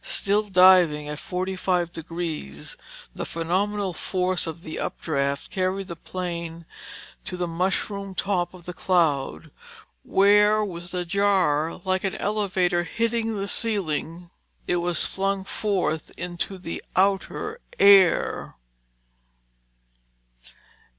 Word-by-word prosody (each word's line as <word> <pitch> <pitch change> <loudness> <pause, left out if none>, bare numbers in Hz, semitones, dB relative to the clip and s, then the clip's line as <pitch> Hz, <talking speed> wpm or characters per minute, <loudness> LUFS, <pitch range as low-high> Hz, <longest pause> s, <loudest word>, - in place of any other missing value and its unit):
Still 205 +1 +1
diving 180 -6 +5
at 150 0 -5
45 180 -1 -1
degrees, 160 - -5 0.4
the - - -5
phenomenal 190 +4 -1
force 185 0 -1
of 165 +1 -7
the 160 - -6
updraft 140 -2 -2
carried 190 +1 -1
the 170 - -5
plane 170 -1 -5 0.6
to 180 - -5
the 180 -1 -1
mushroom 190 +3 -2
top 185 -2 -1
of 175 -2 -15
the 180 - -6
cloud, 165 -7 0 0.5
where 210 - +4
with 175 -2 -7
a 180 -1 -2
jar 175 -5 +1
like 185 0 0
an 195 - -1
elevator 185 -4 0
hitting 230 +3 -1
the 195 - -2
ceiling, 175 -6 -1 0.3
it 175 - +1
was 175 -1 +1
flung 195 0 -1
forth 190 -6 -1
into 175 +2 -4
the 180 -2 -6
outer 200 - 0 0.2
air. 195 -3 +5
180 Hz, 110 wpm, -25 LUFS, 170-195 Hz, 0.6 s, diving